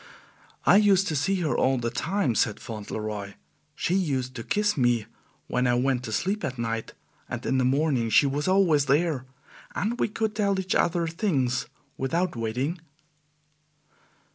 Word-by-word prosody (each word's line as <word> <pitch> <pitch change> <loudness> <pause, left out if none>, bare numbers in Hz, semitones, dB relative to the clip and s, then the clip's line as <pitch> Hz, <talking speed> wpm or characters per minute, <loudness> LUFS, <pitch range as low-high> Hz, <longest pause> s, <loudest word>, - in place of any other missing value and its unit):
"I - - +7
used 200 -2 +4
to 155 - -1
see 185 +8 +1
her 155 - 0
all 130 0 +2
the 115 -1 -2
time," 165 - 0
said 110 -1 +1
Fauntleroy. 105 -2 -5 0.4
"She 175 - -1
used 135 -9 0
to 115 - -6
kiss 205 - +1
me 120 -5 +2 0.4
when 125 0 0
I 120 - +3
went 125 0 +1
to 110 - -5
sleep 195 - -1
at 130 -5 -3
night, 115 -1 -3 0.3
and - - -5
in 130 - +1
the 130 - +2
morning 135 -3 +1
she 145 - +5
was 140 +3 -1
always 175 -7 +3
there, 145 -2 +1 0.5
and 230 +6 -1
we - - +2
could 215 0 -2
tell 200 -2 +1
each 190 0 -1
other 170 0 +2
things 155 - 0 0.3
without 170 +6 -1
waiting." 125 +9 -2
140 Hz, 165 wpm, -26 LUFS, 120-185 Hz, 0.5 s, I